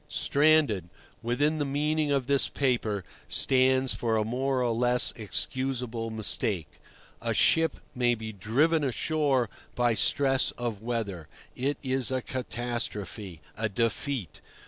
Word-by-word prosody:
"Stranded" 140 Hz, -, +2 dB, 0.3 s
within 145 Hz, +7 st, 0 dB
the -, -, +1 dB
meaning 150 Hz, +2 st, 0 dB
of 135 Hz, -3 st, +1 dB
this 140 Hz, +1 st, +2 dB
paper 115 Hz, -7 st, 0 dB, 0.2 s
stands 130 Hz, -1 st, +4 dB
for 110 Hz, +1 st, 0 dB
a 110 Hz, -, 0 dB
more 130 Hz, +3 st, 0 dB
or 120 Hz, -, +1 dB
less 120 Hz, +1 st, +3 dB
excusable 120 Hz, +2 st, -2 dB
mistake. 105 Hz, -5 st, -1 dB, 0.4 s
A -, -, -1 dB
ship 165 Hz, 0 st, +3 dB
may 120 Hz, -1 st, +2 dB
be 110 Hz, -1 st, -7 dB
"driven 145 Hz, -, +1 dB
ashore" 140 Hz, -1 st, +1 dB, 0.3 s
by 120 Hz, -1 st, +2 dB
stress 135 Hz, +4 st, +2 dB
of 115 Hz, -4 st, -4 dB
weather. 110 Hz, -9 st, -3 dB, 0.3 s
It 140 Hz, +3 st, -1 dB
is 130 Hz, -2 st, 0 dB
a 130 Hz, -1 st, -1 dB
catastrophe, 115 Hz, -, -4 dB
a 110 Hz, 0 st, -2 dB
defeat. 115 Hz, -, -2 dB
125 Hz, 125 wpm, -28 LUFS, 110-135 Hz, 0.4 s, stands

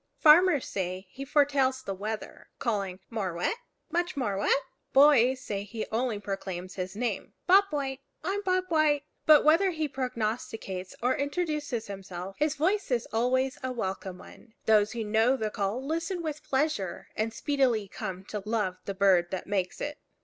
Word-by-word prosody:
Farmers 315 Hz, -1 st, +6 dB
say 185 Hz, 0 st, -3 dB
he 270 Hz, -, -7 dB
foretells 275 Hz, -2 st, +2 dB
the 195 Hz, -, -3 dB
weather, 210 Hz, +3 st, -6 dB
calling, 200 Hz, -6 st, -2 dB
More 195 Hz, -6 st, -2 dB
wet 175 Hz, -, 0 dB, 0.4 s
much 345 Hz, -2 st, -1 dB
more 220 Hz, -7 st, 0 dB
wet! 200 Hz, +7 st, +2 dB, 0.3 s
Boys 265 Hz, -2 st, +6 dB
say 200 Hz, -5 st, -3 dB
he 215 Hz, +2 st, -5 dB
only 230 Hz, 0 st, 0 dB
proclaims 190 Hz, -2 st, -5 dB
his 185 Hz, +1 st, -5 dB
name, 240 Hz, +2 st, -3 dB
Bob 390 Hz, +2 st, +7 dB
White! 275 Hz, -3 st, -2 dB, 0.2 s
I'm 390 Hz, +4 st, -1 dB
Bob 370 Hz, -2 st, +1 dB
White! 305 Hz, -3 st, +3 dB, 0.2 s
But 305 Hz, -1 st, +8 dB
whether 330 Hz, +6 st, +5 dB
he 315 Hz, -3 st, -1 dB
prognosticates 225 Hz, -7 st, -3 dB
or 250 Hz, +1 st, +3 dB
introduces 290 Hz, -5 st, -2 dB
himself, 190 Hz, -1 st, -7 dB
his 300 Hz, 0 st, +1 dB
voice 380 Hz, +8 st, +1 dB
is 245 Hz, -3 st, 0 dB
always 255 Hz, +3 st, +1 dB
a 260 Hz, -1 st, -2 dB
welcome 190 Hz, -5 st, -4 dB
one. 220 Hz, +4 st, -15 dB
Those 215 Hz, -1 st, +4 dB
who 235 Hz, -1 st, -2 dB
know 225 Hz, +5 st, +3 dB
the 215 Hz, -3 st, -2 dB
call 210 Hz, +7 st, -2 dB
listen 335 Hz, +4 st, -2 dB
with 305 Hz, -2 st, -4 dB
pleasure, 265 Hz, -, -1 dB
and 220 Hz, +1 st, -1 dB
speedily 250 Hz, -5 st, +1 dB
come 190 Hz, -2 st, -6 dB
to 210 Hz, -, -3 dB
love 210 Hz, -4 st, -1 dB
the 200 Hz, -, -4 dB
bird 185 Hz, -3 st, +4 dB
that 190 Hz, -, -4 dB
makes 190 Hz, -3 st, -1 dB
it. 295 Hz, 0 st, -4 dB
240 Hz, 165 wpm, -29 LUFS, 200-290 Hz, 0.4 s, But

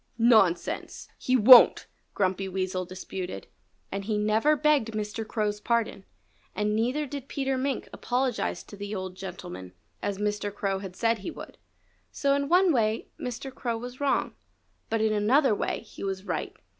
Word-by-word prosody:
"Nonsense! 220 Hz, -7 st, +2 dB
He 255 Hz, -, 0 dB
won't!" 250 Hz, +1 st, +8 dB, 0.3 s
Grumpy 190 Hz, 0 st, 0 dB
Weasel 185 Hz, -1 st, -2 dB
disputed. 185 Hz, 0 st, -6 dB, 0.5 s
And 195 Hz, 0 st, -4 dB
he 215 Hz, 0 st, 0 dB
never 215 Hz, +8 st, +3 dB
begged 290 Hz, -7 st, +2 dB
Mr. 215 Hz, +1 st, -4 dB
Crow's 210 Hz, -3 st, -1 dB
pardon. 225 Hz, -3 st, -1 dB, 0.5 s
And 210 Hz, +1 st, 0 dB
neither 250 Hz, +7 st, 0 dB
did 280 Hz, -1 st, -7 dB
Peter 270 Hz, -1 st, -1 dB
Mink 265 Hz, +1 st, -2 dB
apologize 250 Hz, -1 st, -1 dB
to -, -, -12 dB
the 205 Hz, +1 st, -5 dB
old 185 Hz, -1 st, -5 dB
gentleman, 180 Hz, -, -8 dB, 0.3 s
as 200 Hz, -1 st, -2 dB
Mr. 205 Hz, 0 st, -2 dB
Crow 195 Hz, -1 st, -2 dB
had 190 Hz, -2 st, -8 dB
said 230 Hz, +1 st, +1 dB
he 195 Hz, -, -5 dB
would. -, -, -10 dB, 0.5 s
So 280 Hz, -1 st, +1 dB
in 280 Hz, 0 st, 0 dB
one 360 Hz, 0 st, +5 dB
way 220 Hz, -3 st, 0 dB
Mr. 255 Hz, +2 st, -5 dB
Crow 235 Hz, -3 st, -3 dB
was 245 Hz, +2 st, -8 dB
wrong. 280 Hz, -1 st, +1 dB, 0.6 s
But 225 Hz, 0 st, 0 dB
in 220 Hz, -1 st, +2 dB
another 225 Hz, +5 st, +3 dB
way -, -, -2 dB
he -, -, -11 dB
was 190 Hz, -1 st, -3 dB
right. -, -, -4 dB
215 Hz, 160 wpm, -27 LUFS, 195-255 Hz, 0.6 s, won't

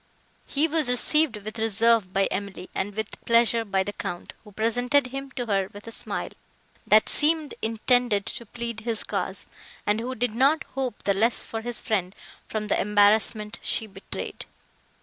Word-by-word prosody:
He 295 Hz, +3 st, +1 dB
was 310 Hz, -4 st, +3 dB
received 260 Hz, 0 st, +4 dB
with 215 Hz, +2 st, -7 dB
reserve 225 Hz, -2 st, +3 dB
by 195 Hz, +1 st, +2 dB
Emily, 195 Hz, -1 st, -5 dB
and 200 Hz, +1 st, -3 dB
with 220 Hz, -1 st, -5 dB
pleasure 230 Hz, 0 st, +3 dB
by 195 Hz, -3 st, 0 dB
the 205 Hz, +2 st, -5 dB
Count, 175 Hz, -, -6 dB
who 210 Hz, -, -14 dB
presented 245 Hz, +6 st, +2 dB
him 270 Hz, +2 st, -6 dB
to 245 Hz, -2 st, -2 dB
her 195 Hz, -3 st, 0 dB
with 205 Hz, +1 st, -11 dB
a 230 Hz, -, -7 dB
smile, -, -, -3 dB, 0.6 s
that 215 Hz, +1 st, +6 dB
seemed 310 Hz, 0 st, +3 dB
intended 225 Hz, -1 st, +2 dB
to 235 Hz, -, -5 dB
plead 235 Hz, 0 st, -5 dB
his 225 Hz, -1 st, -3 dB
cause, -, -, -2 dB, 0.4 s
and 210 Hz, +1 st, +2 dB
who 250 Hz, +3 st, -4 dB
did 245 Hz, -2 st, -1 dB
not 275 Hz, +7 st, +3 dB
hope 260 Hz, -4 st, -3 dB
the 200 Hz, -, +2 dB
less 225 Hz, +5 st, +2 dB
for 225 Hz, -, -5 dB
his 240 Hz, 0 st, -3 dB
friend, 190 Hz, -3 st, -1 dB, 0.3 s
from 215 Hz, -1 st, -3 dB
the -, -, +1 dB
embarrassment 210 Hz, +1 st, +2 dB
she 225 Hz, -, 0 dB
betrayed. 195 Hz, -2 st, -7 dB
225 Hz, 170 wpm, -25 LUFS, 205-245 Hz, 0.6 s, that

